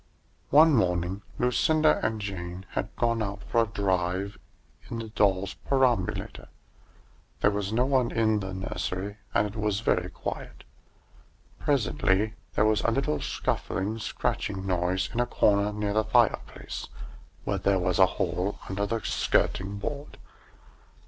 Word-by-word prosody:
One 155 +2 +7
morning 90 -3 +1 0.2
Lucinda 155 +5 +3
and 110 0 0
Jane 95 -2 -5
had - - -2
gone 115 -1 +1
out 100 -1 -4
for 115 - +2
a 115 - +1
drive 95 -1 -1 0.5
in 115 - -4
the 115 -1 -5
doll's 100 -2 +1
perambulator. 130 -8 0 0.9
There 100 - +4
was 100 -1 -2
no 120 +3 +2
one 130 -3 +2
in 110 -2 +2
the 95 -1 -5
nursery, 95 +1 -4 0.2
and - - +4
it 105 +1 -6
was 105 -1 0
very - - +1
quiet. - - -6 1.0
Presently 110 -6 +1 0.2
there 110 - +4
was 110 0 +3
a - - +2
little 115 - 0
scuffling, 105 +4 -2
scratching 100 -2 -2
noise 90 0 0
in 120 - -1
a 120 - +2
corner 105 -3 +3
near 105 -1 -2
the 110 +1 +3
fireplace, - - 0 0.6
where - - -1
there 100 0 +2
was 90 0 0
a 95 - +8
hole 95 +3 -1
under 100 +2 -1
the 115 +2 -1
skirting 100 +2 0
board. 140 +8 -5
105 Hz, 140 wpm, -27 LUFS, 95-115 Hz, 1.0 s, a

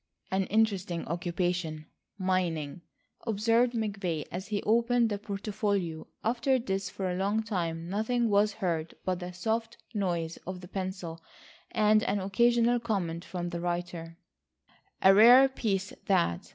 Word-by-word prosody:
"An 190 0 +1
interesting 195 -5 0
occupation, 170 -2 -2 0.3
mining," 180 -5 -1 0.5
observed 230 +3 +2
McVay 200 -8 -2
as 185 +3 -5
he 210 -1 -2
opened 235 +1 +3
the 205 - -2
portfolio. 200 -5 -2 0.2
After 245 +3 +2
this 195 -5 -2
for 190 +1 -3
a - - -2
long 200 +4 0
time 170 -6 -3
nothing 220 +5 0
was 205 0 +3
heard 170 -6 -2
but 185 -1 0
the 180 0 -6
soft 225 +6 -2 0.2
noise 175 -5 -1
of 185 -1 -5
the 180 - -10
pencil 185 -3 -5 0.5
and 215 0 +4
an 205 -2 0
occasional 235 +5 +3
comment 185 -8 -2
from 175 -2 -4
the 170 -1 -4
writer: 175 -1 -4 0.9
"A 190 - +8
rare 245 +6 +8
piece 200 -7 -2
that. 85 - +1
195 Hz, 140 wpm, -29 LUFS, 175-220 Hz, 0.9 s, A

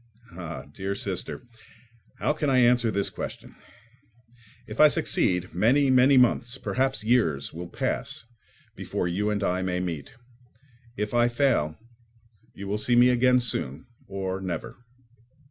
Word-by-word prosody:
Ah, 85 -1 -7
dear 95 +6 -5
sister, 95 +4 -4 0.7
how - - 0
can 150 -1 -1
I 130 - +3
answer 120 -1 +4
this 100 -2 0
question? - - -7 1.1
If - - -9
I 155 - +9
succeed, 90 -10 0
many, 130 +9 +3
many 130 +2 +5
months, 125 0 +2
perhaps 130 -3 -1
years, 105 - +1
will 85 +2 -7
pass - - -3 0.5
before - - -3
you 100 +5 -1
and 105 -1 -1
I 90 -1 0
may 90 -1 -1
meet. 85 -5 -5 0.8
If 105 +1 -3
I 120 0 +4
fail, 120 - +1 0.8
you 100 - -7
will 105 +2 -2
see 120 +3 +1
me 120 +1 +6
again 125 +1 +4
soon, 80 - -2 0.2
or 95 0 -4
never. 90 -4 -5
105 Hz, 140 wpm, -26 LUFS, 90-125 Hz, 1.1 s, I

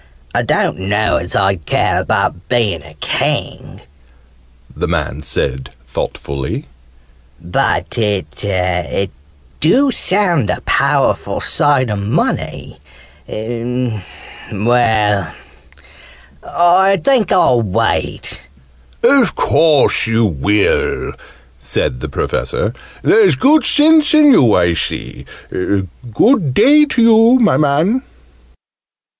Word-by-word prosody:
"I - - +1
don't - - 0
know 105 +3 0
as 85 +1 -4
I'd 95 -6 0
care - - +1
about 85 - -2
being 110 -9 0
a 75 +2 -15
King," - - -3 0.9
the - - -3
man 75 - -3
said 65 -3 -3 0.2
thoughtfully. 70 +2 -5 0.7
"But 85 +6 -1
it 95 -1 -2 0.5
dew 260 - +3
sound 180 - 0
a - - -1
powerful - - 0
sight 135 -5 +1
o' 105 - -2
money! 100 +3 -3 0.5
Well, 120 0 -4 2.5
I 185 +3 +3
think 215 - +1
I'll 165 -10 +3
wait 100 -5 -2 0.3
" 65 0 -32
"Of - - +3
course 155 -7 +2
you 115 0 +1
will!" 100 +4 0 0.5
said 60 +1 -3
the - - -6
Professor. - - -2 0.3
"There's 200 -9 +4
good 300 - +3
sense 310 +1 +4
in 300 -2 +6
you, 120 - +4
I 85 0 +2
see. 80 - -5 0.2
Good 120 - -1
day 300 +2 +5
to 260 -4 -1
you, 230 +2 +5
my 220 -4 +3
man!" 155 - +1
120 Hz, 100 wpm, -15 LUFS, -, 2.5 s, in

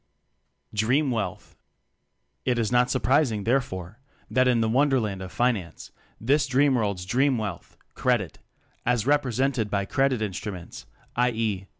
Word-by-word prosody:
Dream 125 +7 +2
Wealth. 105 -7 -4 0.9
It 125 -1 +1
is 115 -2 0
not 125 0 +3
surprising 130 -4 +2
therefore 110 -5 -2 0.3
that 130 0 +3
in 125 -2 +3
the 110 - +2
wonderland 120 -6 +1
of 95 -1 -7
Finance 110 -9 -1 0.3
this 140 +6 +2
dreamworld's 125 -9 +2
dream 130 +6 +2
wealth 105 -6 -6 0.2
"Credit" - - 0 0.4
as 120 -2 +1
represented 130 -4 +1
by 100 -1 0
"credit 135 +1 +1
instru 105 0 -3
ments," 90 -2 -10 0.3
i. 125 +1 +3
e. 110 -5 -2
120 Hz, 130 wpm, -26 LUFS, 105-130 Hz, 0.9 s, not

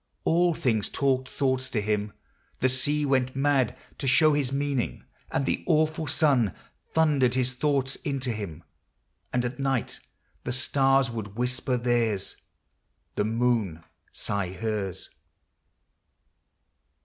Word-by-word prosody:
All 170 0 +3
things 110 -8 +1
talked 130 -2 0
thoughts. 130 -2 0
to 115 - -1
him. 105 0 -1 0.5
The 130 - +3
sea 145 +3 +1
went 130 -2 +1
mad 135 -2 +2 0.2
To 135 - -2
show 155 +4 +5
his 140 -3 0
meaning; 140 -2 -1 0.3
and 135 - 0
the - - -1
awful 155 -1 +2
sun 135 - +3 0.4
Thundered 145 -6 +3
his 130 0 +1
thoughts 135 0 0
into 135 -3 -2
him; 90 -7 -6 0.7
and 125 -1 0
at 125 +1 -4
night 135 -3 -1 0.4
The 125 - -2
stars 135 0 +2
would 105 -3 -6
whisper 125 +1 0
theirs, 120 -5 0 0.8
the 105 - 0
moon 110 -7 0 0.3
sigh 100 -3 -3
hers. 95 -2 -3
130 Hz, 125 wpm, -27 LUFS, 115-140 Hz, 0.8 s, show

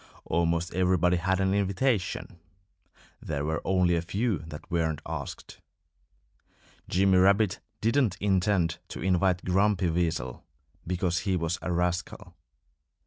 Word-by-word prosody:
Almost 85 0 0
everybody 90 0 +2
had 95 +2 0
an 95 0 +2
invitation. 100 -2 -1 0.8
There 75 -2 -3
were 80 +1 -1
only 90 -2 +2
a 85 - 0
few 95 +3 -1
that 80 -2 -10
weren't 80 -3 0
asked. - - -7 1.3
Jimmy 95 0 +4
Rabbit 100 +1 +3 0.2
didn't 115 -4 +2
intend 95 -4 +1
to - - -8
invite 90 -1 +1
Grumpy 95 -1 +2
Weasel 80 -8 -2 0.4
because 90 -1 0
he 95 0 -1
was 85 -1 -1
a 90 - -3
rascal. 90 +1 -2
90 Hz, 120 wpm, -28 LUFS, 85-95 Hz, 1.3 s, Jimmy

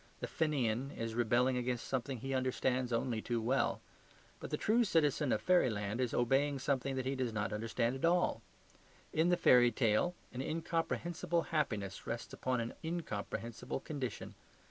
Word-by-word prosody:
The - - -3
Fenian 135 -5 0
is 115 0 -3
rebelling 120 +2 +2
against 125 -1 -2
something 130 0 -2
he 135 +4 -4
understands 130 -1 0
only 115 -1 0
too 120 0 -1
well; 125 +5 +1 0.6
but - - -7
the - - -1
true 230 +3 +3
citizen 150 - +2
of - - 0
fairyland 115 - +2
is 125 -2 0
obeying 135 +4 +2
something 135 0 -1
that 130 -1 -2
he 135 - 0
does 130 -3 -1
not 105 -1 -2
understand 115 +3 -1
at 135 - -7
all. 170 -8 +2 0.7
In 160 +3 +3
the 175 - +3
fairy 120 -5 +6
tale 115 +9 +2 0.2
an 125 - -3
incomprehensible 165 +2 -1
happiness 105 -11 -1
rests 115 0 -4
upon 130 -1 -1
an 115 - -4
incomprehensible 120 -8 -4
condition. 135 -5 -5
130 Hz, 160 wpm, -35 LUFS, 115-150 Hz, 0.7 s, fairy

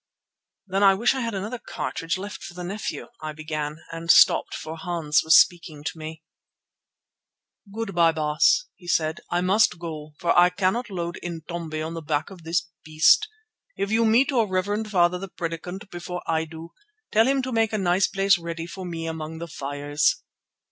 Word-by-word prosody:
"Then 195 0 -1
I 195 -1 +6
wish 235 +7 +2
I 265 - -3
had 230 -4 -2
another 215 +6 -4
cartridge 165 -4 -3
left 200 +2 -7
for 175 - -9
the 180 - -6
nephew," 200 +6 -5
I 155 0 -5
began 155 0 -5
and 165 0 -7
stopped, - - +6
for 160 - -6
Hans 165 -2 0
was 160 +1 +7
speaking 165 -4 +1
to 160 - -4
me. 160 0 -8 1.5
"Good 220 -1 -4
bye, 170 -1 +4
Baas," 155 - +2
he 175 - -17
said, 160 -1 0
"I 175 - +1
must 190 +1 +3
go, 155 -3 -7
for 175 - +1
I 175 0 +7
cannot 195 +6 0
load 175 -3 -4
'Intombi' 165 -2 -5
on 165 - -5
the 165 - -5
back 150 +3 -2
of 185 -3 -11
this 165 +1 -1 0.2
beast. 160 - +4 0.5
If 200 - -2
you 225 +1 +3
meet 235 +6 +4
your 235 -5 +2
reverend 205 +3 -1
father 180 -2 +3
the 195 - -6
Predikant 180 +4 -6
before 175 0 -6
I 160 0 0
do, 160 +1 -10 0.4
tell 225 +2 +4
him 270 0 +2
to 260 - -3
make 225 -2 +2
a 215 - 0
nice 190 0 +2
place 195 -1 +3
ready 170 -1 -5
for 185 +2 -8
me 165 -1 -5
among 160 0 -5
the 170 +1 -6
fires." 145 0 -1
175 Hz, 185 wpm, -25 LUFS, 160-195 Hz, 1.5 s, was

